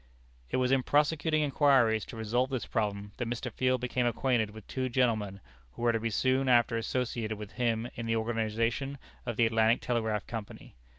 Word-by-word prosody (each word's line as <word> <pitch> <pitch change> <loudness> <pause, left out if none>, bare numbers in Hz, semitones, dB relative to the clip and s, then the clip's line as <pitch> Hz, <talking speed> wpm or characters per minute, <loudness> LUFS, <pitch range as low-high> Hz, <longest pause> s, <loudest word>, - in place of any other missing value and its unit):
It - - 0
was 130 0 +1
in 135 -1 +4
prosecuting 150 +2 +2
inquiries 135 -7 +3
to 115 - -9
resolve 120 +4 0
this 130 -3 -2
problem, 105 -2 -2
that 120 - -2
Mr. 120 +1 -3
Field 130 0 +1
became 125 0 0
acquainted 120 -2 +1
with 110 -1 -12
two 130 -1 -3
gentlemen 110 -6 0 0.3
who - - -7
were 120 - +4
to 115 - 0
be 115 +1 -1
soon 130 +4 +1
after 120 -1 +4
associated 115 -2 -2
with 105 -1 -8
him 120 -2 0
in 115 -1 -5
the 115 - +1
organization 115 +4 -1 0.3
of 120 - -3
the 120 - +5
Atlantic 115 +1 +3
Telegraph 110 -4 -1
Company. 110 -3 -8
120 Hz, 185 wpm, -30 LUFS, 110-130 Hz, 0.3 s, the